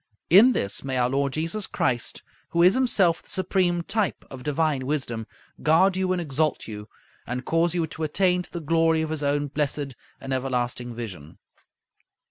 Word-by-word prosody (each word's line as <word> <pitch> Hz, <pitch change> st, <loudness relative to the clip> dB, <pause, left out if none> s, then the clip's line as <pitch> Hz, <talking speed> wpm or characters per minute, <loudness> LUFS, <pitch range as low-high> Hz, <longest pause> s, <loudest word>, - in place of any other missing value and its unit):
In 225 Hz, +8 st, +8 dB
this 100 Hz, -, -2 dB
may 135 Hz, -1 st, -2 dB
our 125 Hz, 0 st, +2 dB
Lord 140 Hz, 0 st, 0 dB
Jesus 165 Hz, +6 st, -2 dB
Christ, 120 Hz, -3 st, -2 dB, 0.3 s
who 170 Hz, 0 st, +2 dB
is 180 Hz, +2 st, +7 dB
himself 205 Hz, -10 st, +3 dB
the -, -, -16 dB
supreme 185 Hz, -2 st, 0 dB
type 215 Hz, +1 st, -1 dB
of 135 Hz, -2 st, -8 dB
divine 145 Hz, -1 st, 0 dB
wisdom, 120 Hz, -6 st, -2 dB, 0.3 s
guard 175 Hz, +5 st, +4 dB
you 185 Hz, 0 st, 0 dB
and 185 Hz, -, +1 dB
exalt 155 Hz, -2 st, -1 dB
you, 105 Hz, -1 st, -7 dB, 0.4 s
and 125 Hz, +1 st, -4 dB
cause 165 Hz, +1 st, +1 dB
you 170 Hz, -2 st, +1 dB
to 160 Hz, +1 st, -9 dB
attain 180 Hz, +3 st, +2 dB
to -, -, -12 dB
the 170 Hz, -, -5 dB
glory 165 Hz, +1 st, +2 dB
of 160 Hz, -, -4 dB
His 160 Hz, -2 st, -3 dB
own 145 Hz, 0 st, +1 dB
blessed 145 Hz, -1 st, -2 dB, 0.3 s
and 135 Hz, 0 st, -4 dB
everlasting 125 Hz, -2 st, -2 dB
vision. 95 Hz, -10 st, -8 dB
155 Hz, 175 wpm, -25 LUFS, 130-175 Hz, 0.4 s, In